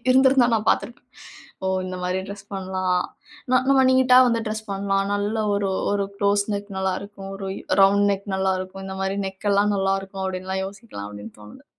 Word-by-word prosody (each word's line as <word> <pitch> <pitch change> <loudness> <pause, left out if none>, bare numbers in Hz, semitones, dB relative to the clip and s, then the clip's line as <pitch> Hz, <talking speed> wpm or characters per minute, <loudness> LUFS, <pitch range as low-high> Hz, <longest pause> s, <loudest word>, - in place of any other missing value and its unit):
இருந்திருந்தா 265 -1 +5
நான் 215 - -4
பார்த்திருப்பேன். 240 +1 -2 0.6
ஓ! - - +1 0.2
இந்த 185 0 -5
மாரி 180 +1 -1
டிரெஸ் 200 -1 -8
பண்ணலாம். 185 -1 -1 0.5
ந - - +5
நம்ம 275 -1 +5
நீட்டா 260 -1 +5
வந்து 230 -1 +1
டிரெஸ் 215 0 -4
பண்லாம். 195 0 0
நல்ல 205 +2 -1 0.2
ஒரு 200 -1 0 0.2
ஒரு 200 -1 0
குளோஸ் 200 0 +2
நெக் 200 +1 -5
நல்லா 190 -1 0
இருக்கும், 200 -1 -9
ஒரு 195 -1 -5 0.3
ரவுண்ட் 200 +1 +5
நெக் 200 +1 -5
நல்லா 190 0 +1
இருக்கும். 190 +1 -8
இந்த 190 0 -6
மாரி 195 +1 -1
நெக் 190 +2 -4
எல்லாம் 205 +1 +3
நல்லா 195 0 +1
இருக்கும், 195 0 -6
அப்படின்னுலாம் 190 0 -3
யோசிக்கலாம் 195 - -9
அப்படின்னு 105 +1 -10
தோணுது. 105 0 -14
195 Hz, 185 wpm, -23 LUFS, 190-205 Hz, 0.6 s, இருந்திருந்தா